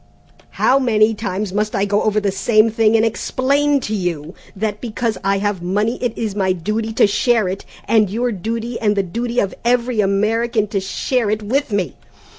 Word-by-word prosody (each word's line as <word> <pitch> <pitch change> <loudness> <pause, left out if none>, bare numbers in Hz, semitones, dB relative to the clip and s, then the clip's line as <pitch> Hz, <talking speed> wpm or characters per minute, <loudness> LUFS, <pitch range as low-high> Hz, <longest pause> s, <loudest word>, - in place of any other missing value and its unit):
How 270 - +4
many 225 -4 +3
times 205 -2 -3
must 210 +1 -1
I 195 - +1
go 205 +1 +1
over 215 0 +1
the 205 -2 0
same 215 +3 +3
thing 225 0 +3
and 225 0 +4
explain 280 +5 +1
to 215 - -4
you 175 -5 -3 0.2
that 210 +1 -3
because 230 -1 -2
I 195 0 +2
have 200 -2 -1
money 205 +6 -1
it 245 -3 -2
is 220 -3 -2
my 190 -2 +1
duty 215 +6 -2
to - - +4
share 220 +1 +2
it, 190 +2 -4 0.2
and 215 -3 +3
your 240 +4 -1
duty 230 +4 -4
and 210 -2 +1
the 200 - +1
duty 235 +6 -4
of 195 - 0
every 240 -1 +1
American 215 +3 +1
to 200 - -1
share 215 +4 -1
it 215 0 -1
with 260 +4 -1
me? 200 -4 -1
215 Hz, 195 wpm, -19 LUFS, 200-230 Hz, 0.2 s, How